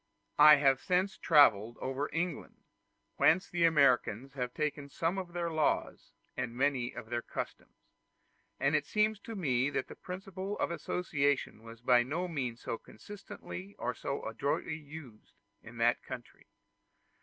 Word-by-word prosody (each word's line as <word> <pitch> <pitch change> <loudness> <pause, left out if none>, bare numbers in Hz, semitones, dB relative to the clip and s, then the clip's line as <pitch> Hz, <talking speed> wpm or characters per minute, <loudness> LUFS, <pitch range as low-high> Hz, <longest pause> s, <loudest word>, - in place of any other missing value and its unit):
I 150 +1 +10
have 135 -2 +3
since 185 +2 +1
travelled 120 -8 +4
over 135 +3 -2
England, 170 -1 -4 0.5
whence 185 +4 +4
the 175 -3 +1
Americans 135 -5 +3
have 125 -2 -3
taken 145 0 -3
some 170 +6 -1
of 175 -2 -7
their 170 -1 -2
laws 155 -2 -1 0.2
and 125 -2 -3
many 130 -2 +1
of 110 - -9
their 120 0 0
customs; - - -7 0.8
and 140 +2 +2
it 150 -1 0
seemed 215 -1 +1
to 225 - -6
me 135 -8 +1
that 140 - -3
the - - -9
principle 190 +2 -6
of - - -1
association 145 -9 -1
was 115 0 -12
by 125 -1 +5
no 160 +9 -2
means 130 -8 -4
so 115 - -4
constantly 200 -1 -10
or - - -2
so - - -4
adroitly 160 - -2
used 145 -7 -12 0.3
in - - -12
that - - +2
country. - - -10
145 Hz, 150 wpm, -32 LUFS, 125-175 Hz, 0.8 s, I